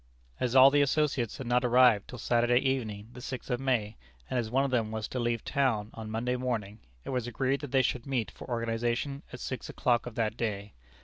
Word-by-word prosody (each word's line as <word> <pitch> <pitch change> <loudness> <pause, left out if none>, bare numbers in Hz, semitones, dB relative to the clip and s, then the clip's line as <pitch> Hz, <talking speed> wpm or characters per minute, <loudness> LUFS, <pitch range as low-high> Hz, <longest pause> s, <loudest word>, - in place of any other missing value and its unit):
As 125 0 -1
all 135 +1 +9
the 145 0 +4
associates 140 -5 +1
had 135 - -6
not 120 +1 +2
arrived 125 -4 +5
till 125 - -8
Saturday 120 +1 +2
evening, 115 -6 -1
the 125 - -10
6th 125 +1 -6
of 120 - 0
May, 115 -6 0 0.3
and 130 - +1
as 115 -2 -2
one 135 +4 +2
of 135 - -2
them 115 -4 +1
was 110 0 -3
to 130 - -3
leave 120 -2 -1
town 120 -7 0
on 110 -1 -7
Monday 120 +3 -1
morning, 115 -5 -3 0.3
it - - -4
was 125 -2 -1
agreed 135 +4 -1
that 145 - -6
they 135 -1 +4
should 125 +1 -2
meet 120 -7 -1
for - - -11
organization 120 +4 -1
at 125 - -8
six 130 -2 -5
o'clock 120 -1 +1
of 120 - -8
that 110 -2 0
day. 105 -3 -3
120 Hz, 225 wpm, -29 LUFS, 115-130 Hz, 0.3 s, all